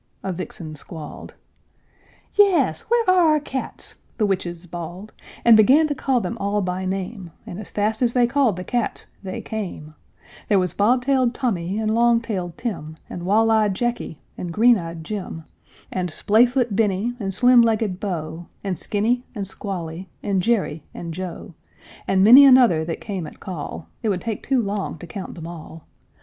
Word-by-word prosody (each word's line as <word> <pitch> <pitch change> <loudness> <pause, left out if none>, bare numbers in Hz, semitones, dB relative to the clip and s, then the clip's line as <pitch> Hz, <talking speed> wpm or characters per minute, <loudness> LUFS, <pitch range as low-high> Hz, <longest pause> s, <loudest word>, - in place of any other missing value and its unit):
a 190 - -2
vixen 165 -3 -7
squalled. 155 +1 -9 1.0
"Yes, 400 -3 +3
where 470 -2 +2
are 355 -4 +5
our 305 - +3
cats?" 270 -2 -5 0.2
the 215 - +2
witches 180 -3 -2
bawled, 175 +4 -8 0.3
And 235 -1 +9
began 265 +9 +6
to - - +1
call 265 -2 +1
them 230 0 -4
all 200 +1 0
by 185 +1 -2
name: 190 0 -4 0.2
As 200 +4 -7
fast 215 +2 -1
as 240 -1 +2
they 245 -1 +5
called 255 -4 +2
the 180 - -5
cats, 240 +3 -2 0.2
they 190 -1 -5
came: 185 -8 -6 0.6
There 205 - +4
was 180 -3 0
bob 245 +5 +2
tailed 260 -3 +2
Tommy 195 -7 -1
and 220 0 0
long 235 0 +4
tailed 185 -7 -4
Tim, 165 -10 -5 0.2
And 175 0 -6
wall 225 +3 +4
eyed 215 -3 +3
Jacky 240 -8 -3 0.2
and 175 - -4
green 230 +5 +5
eyed 165 -1 -7
Jim, 185 -3 -5 0.5
And 180 -1 -2
splay 215 +9 +4
foot 245 -4 0
Benny 210 +2 +1
and 195 -3 -2
slim 245 +4 +6
legged 220 -5 +1
Beau, 170 -4 -4 0.2
And 190 -3 -3
Skinny 235 +4 0
and 200 -2 -3
Squally, 180 -3 -5
and 195 -2 +1
Jerry 195 -7 0
and 170 -1 -6
Joe, 180 -1 -7 0.5
And 190 0 +3
many 250 +7 +10
another 250 - +6
that 165 - -4
came 190 -7 -4
at - - -13
call, 170 -2 -6
It 225 - 0
would 185 -3 -1
take 225 -3 -4
too 260 -3 +1
long 200 -3 -3
to 165 - -10
count 185 +3 -7
them 165 -2 -8
all. 165 -1 -10
205 Hz, 175 wpm, -22 LUFS, 180-235 Hz, 1.0 s, many